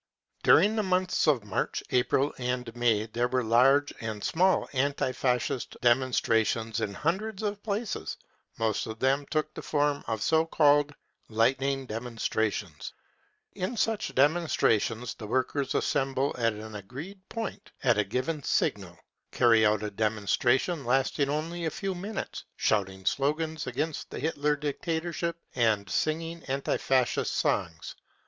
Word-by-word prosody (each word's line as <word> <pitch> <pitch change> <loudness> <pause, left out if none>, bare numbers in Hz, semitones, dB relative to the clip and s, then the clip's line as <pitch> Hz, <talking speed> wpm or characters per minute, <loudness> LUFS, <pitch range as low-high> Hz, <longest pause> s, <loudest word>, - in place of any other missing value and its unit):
During 215 +2 +5
the 220 - +2
months 185 -3 +1
of 135 -8 +3
March, 100 -2 -2
April 125 +3 +2
and 125 -2 -3
May 115 -3 +2
there 120 +2 -1
were 125 0 0
large 135 +6 +4
and 110 -2 -5
small 185 +3 +2
anti 140 0 0
Fascist 125 -1 -1
demonstrations 115 -2 +2
in 100 -2 -2
hundreds 195 +6 -2
of 205 -1 -2
places; 215 +1 -3 0.4
most 110 -1 0
of 110 0 -6
then^ 135 +3 +1
took 155 -1 -1
the - - -7
form 145 -1 0
of 110 -2 -2
so 160 0 +3
called 145 -2 +3 0.2
" - - -51
lightning 135 +4 +1
demonstrations." 110 -7 -3 0.6
In 190 +6 -3
such 220 0 -1
demonstrations 130 -6 +2
the 105 - -9
workers 130 +4 -1
assemble 135 0 0
at 115 -2 +1
an 110 +1 -9
agreed 135 - -8
point 225 -3 -5
at 120 -5 +3
a - - +4
given 130 +9 -2
signal, - - -1 0.3
carry 115 -2 +4
out 105 0 +1
a 105 - -3
demonstration 110 - +1
lasting 135 +3 +1
only 165 +4 -2
a - - +1
few 195 +1 -3
minutes, 195 +4 -5
shouting 95 -2 0
slogans 155 - 0
against 145 +5 -3
the - - -7
Hitler 150 0 0
dictatorship 165 +3 -2 0.2
and 110 -5 +2
singing 165 +1 -1
anti 135 +1 -1
Fascist 130 -2 +1
songs. 80 -1 -1
135 Hz, 140 wpm, -28 LUFS, 115-160 Hz, 0.6 s, During